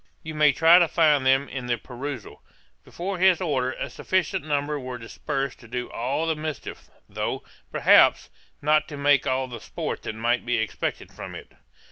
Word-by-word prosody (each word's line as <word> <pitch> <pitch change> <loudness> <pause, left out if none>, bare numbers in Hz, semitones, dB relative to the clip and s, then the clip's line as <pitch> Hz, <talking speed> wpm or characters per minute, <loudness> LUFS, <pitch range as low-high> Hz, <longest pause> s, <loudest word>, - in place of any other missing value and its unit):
You 160 -1 -6
may 150 -1 +5
try 165 +5 +6
to 170 - +4
find 150 -4 +3
them 135 +1 +3
in 125 -2 -6
the 120 -1 0
perusal. 130 -2 -7 0.4
Before 185 +1 -5
his 185 -2 +5
order, 130 -7 0
a - - -4
sufficient 185 -6 -1
number 145 0 -1
were 130 -1 -6
dispersed 135 +3 -4
to 120 - -14
do 125 +1 -5
all 130 +7 -1
the 160 -1 0
mischief, 155 -1 -6 0.2
though, - - -3 0.3
perhaps, - - +5 0.3
not 155 +1 +3
to 145 - -8
make 140 -1 +3
all 130 0 0
the 120 -2 -8
sport - - -5
that 110 - -5
might 120 +2 0
be 120 0 0
expected 110 -1 -3
from - - -8
it. - - -11
140 Hz, 180 wpm, -25 LUFS, 125-155 Hz, 0.4 s, try